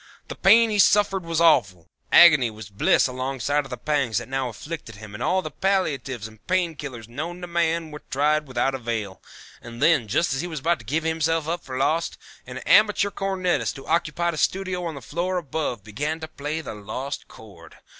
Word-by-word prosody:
The - - -5
pain 230 0 +5
he 210 - 0
suffered 195 -2 +4
was 165 -1 -1
awful. 95 - +3 0.2
Agony 150 -8 +7
was 110 -1 -11
bliss 100 - +3
alongside 135 +2 -1
of - - -11
the 125 - -5
pangs 135 -4 0
that 120 - -3
now 135 -1 -2
afflicted 135 0 -8
him 105 0 -11
and 110 - -8
all 185 +9 +1
the 155 - -6
palliatives 140 - -1
and 110 -1 -18
pain 180 -2 +1
killers 130 -7 -8
known 155 +9 -6
to - - -4
man 170 -2 -1
were 150 - -9
tried 150 +2 +1
without 130 +1 0
avail, 115 -6 -4 0.4
and 120 0 -10
then, 150 -6 +3
just 140 +8 +1
as 135 - -1
he 175 - -4
was 160 -3 -5
about 170 +4 +1
to 115 - -14
give 155 +8 -1
himself 160 -1 0
up 170 0 -2
for 130 -2 -6
lost, 160 +5 0 0.3
an - - -7
amateur 210 -1 +4
cornetist 190 -3 -1
who 135 - -10
occupied 170 +1 0
a - - -6
studio 185 +1 -1
on 165 -2 -4
the 140 - -9
floor 175 +9 -2
above 145 - -3
began 145 +10 -3
to 160 - -6
play 155 +1 -4
the - - -7
Lost 125 +7 -6
Chord. 95 -7 -15
150 Hz, 205 wpm, -24 LUFS, 120-170 Hz, 0.4 s, Agony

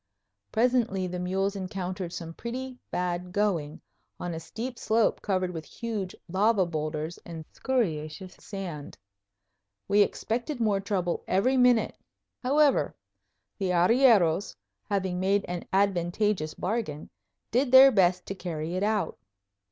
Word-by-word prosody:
Presently 230 -5 +2
the 180 0 -4
mules 190 +2 -1
encountered 185 -2 -4
some 165 -1 -6
pretty 255 +6 -5
bad 180 0 -2
going, 175 -7 0 0.4
on 175 -1 -4
a 160 - -4
steep 235 +9 -6
slope 220 +1 +2
covered 185 -3 0
with 165 -3 -6
huge 205 +2 -5
lava 195 +2 +3
boulders 155 0 -3
and 165 -2 -8
scoriaceous 180 - -2
sand. 180 -8 -7 0.9
We 205 +1 +4
expected 240 +7 -1
more 210 -4 +2
trouble 190 -3 -2
every 220 +8 +2
minute. 250 -3 +3 0.4
However, 280 +3 +3 0.6
the 190 -2 0
arrieros, 195 -2 +4 0.3
having 190 -3 -1
made 195 +2 +2
an 175 -1 -4
advantageous 190 -2 +1
bargain, 185 -8 -3 0.4
did 250 +2 +2
their 265 +1 +10
best 185 -4 +3
to - - -4
carry 170 -3 -4
it 185 - -1
out. 210 0 0
190 Hz, 125 wpm, -28 LUFS, 175-225 Hz, 0.9 s, their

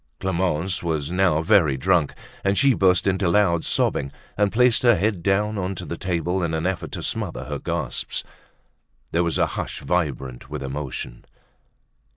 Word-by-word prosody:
Clemence 95 -1 0
was 80 -3 -2
now 90 -4 +2
very 80 -5 +4
drunk 85 0 +2 0.3
and 100 0 +1
she 140 -1 +5
burst 95 -3 +3
into 95 -2 +1
loud 85 -3 +3
sobbing 70 -1 0 0.2
and 105 -1 +2
placed 120 -1 +4
her 120 -2 +5
head 100 0 0
down 105 +3 +1
onto 90 -1 -3
the 85 - -4
table 90 +1 -1
in 80 -2 -1
an 80 +1 -2
effort 95 -1 -2
to - - -4
smother - - -2
her - - -4
gasps. - - -3 0.9
There 85 +1 +2
was 85 -1 0
a - - +3
hush - - -5
vibrant 70 -6 -2
with 75 -2 -5
emotion. 65 -3 -5
90 Hz, 165 wpm, -23 LUFS, 80-95 Hz, 0.9 s, she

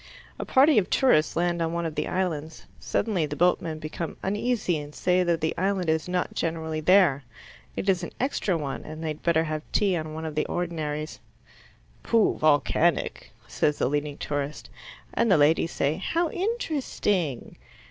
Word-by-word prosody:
A - - -3
party 275 -1 +5
of 185 - -3
tourists 160 - +3
land 175 0 0
on 165 0 -1
one 170 0 -2
of 160 - -3
the 150 0 -2
islands. 160 -4 -3
Suddenly 185 -9 0
the 150 - -5
boatmen 170 -1 +1
become 155 +1 -5
uneasy, 205 -4 0
and 145 0 -9
say 180 0 +2
that 170 -2 +1
the 160 - 0
island 190 -2 0
is 160 +1 -1
not 180 0 -1
generally 160 -1 -2
there. 160 -4 +4 0.5
It - - -4
is 185 -2 +3
an 175 - -6
extra 225 -8 0
one, 140 -3 -4
and 155 +1 -8
they 160 - -2
had 150 0 -5
better 165 -1 +2
have 155 -1 -3
tea 200 -3 +2
on 155 -2 -4
one 160 0 -5
of 155 - -4
the 150 - -1
ordinaries. 155 -3 -3 0.8
"Pooh, 230 -2 +2
volcanic!" 150 -2 +1 0.2
says 150 -1 0
the - - +1
leading 145 +1 -2
tourist, 145 0 -4 0.4
and 230 - +2
the 190 - +6
ladies 160 +3 +3
say 145 +3 0
how 330 - -1
interesting. 275 - -2
165 Hz, 175 wpm, -26 LUFS, 155-185 Hz, 0.8 s, the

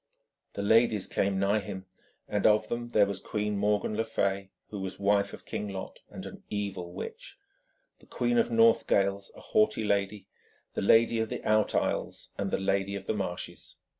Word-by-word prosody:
The 100 - -4
ladies 110 -1 +4
came 100 0 0
nigh 100 +2 +2
him, 95 -2 -7 0.4
and 105 -1 +2
of 110 0 +3
them 120 0 -3
there 105 -3 +4
was 100 -1 -3
Queen 105 -1 -2
Morgan 105 +1 +1
le 110 - +1
Fay, 100 -3 -1 0.2
who 105 - -5
was 95 0 -5
wife 100 0 +2
of - - -11
King 105 - -4
Lot, 95 -1 -7
and - - -8
an - - -9
evil 100 -4 -4
witch; 465 - -8 0.6
the - - -21
Queen 240 -1 +1
of 230 +1 +2
Northgales, 100 - +3
a - - -12
haughty 215 - +2
lady; 100 0 0 0.5
the - - -2
Lady 115 +3 +4
of 110 -1 -1
the - - -5
Out 110 -1 +3
Isles; - - -1
and 100 - -2
the - - 0
Lady 95 0 0
of 100 - -6
the - - 0
Marshes. 95 -4 -5
100 Hz, 185 wpm, -29 LUFS, 100-110 Hz, 0.6 s, ladies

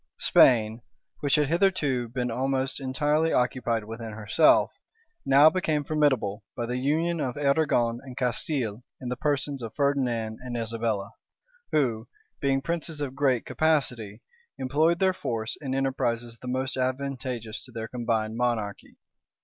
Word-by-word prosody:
Spain, 115 -2 +4 0.4
which 145 -2 +2
had 150 -1 +3
hitherto 155 - +1
been 125 0 -2
almost 130 +2 0
entirely 150 +4 +1
occupied 125 -2 0
within 115 +1 -7
herself, 110 +9 +4 0.6
now 140 +3 +7
became 155 -3 +1
formidable 130 -9 +1
by 120 - -1
the 125 +1 -2
union 160 +5 0
of 130 -3 -2
Arragon 140 -5 +2
and 130 -2 -11
Castile 125 -3 -1 0.2
in 125 - -5
the 125 - -2
persons 145 -1 -1
of 115 -1 -7
Ferdinand 125 -6 0
and 125 -1 -5
Isabella, 115 -3 -2 0.6
who, 120 -6 +1 0.3
being 135 -1 +1
princes 165 -2 -3
of 140 -3 -3
great 135 -4 +1
capacity, 125 -9 0 0.3
employed 155 +6 +2
their 190 +1 +3
force 115 -9 -3
in 135 -2 -3
enterprises 120 -3 -1
the 125 - -8
most 130 +1 -2
advantageous 130 -3 -3
to 130 - -14
their 115 -1 -5
combined 115 -3 -1
monarchy. 115 -4 -2
130 Hz, 140 wpm, -27 LUFS, 115-145 Hz, 0.6 s, now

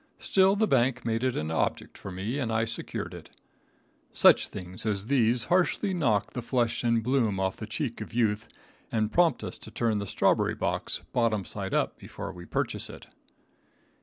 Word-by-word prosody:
Still 190 0 +3
the 220 +2 +3
bank 130 - +2
made 115 +1 0
it 130 -1 0
an 80 +1 -2
object 80 - -1
for 100 - -8
me, 100 +9 -3
and 120 -5 -1
I 110 0 +1
secured 115 - -4
it. - - -10 0.8
Such - - +6
things 90 0 -6
as 105 -2 0
these 120 -2 +3
harshly 185 +2 +1
knock 120 - +1
the 125 - -4
flush 120 0 0
and 115 -1 +2
bloom 115 -6 +1
off 95 0 -1
the 110 - -6
cheek 115 +1 -3
of 105 - -7
youth, 110 -3 0 0.4
and 110 -1 0
prompt 175 -1 +3
us - - -6
to - - -9
turn 115 -3 0
the 100 - -4
strawberry - - +2
box - - -2
bottom 110 -5 +1
side 95 -2 -4
up - - 0
before - - -7
we 90 -2 -11
purchase - - -2
it. - - -11
115 Hz, 185 wpm, -28 LUFS, 105-130 Hz, 0.8 s, Such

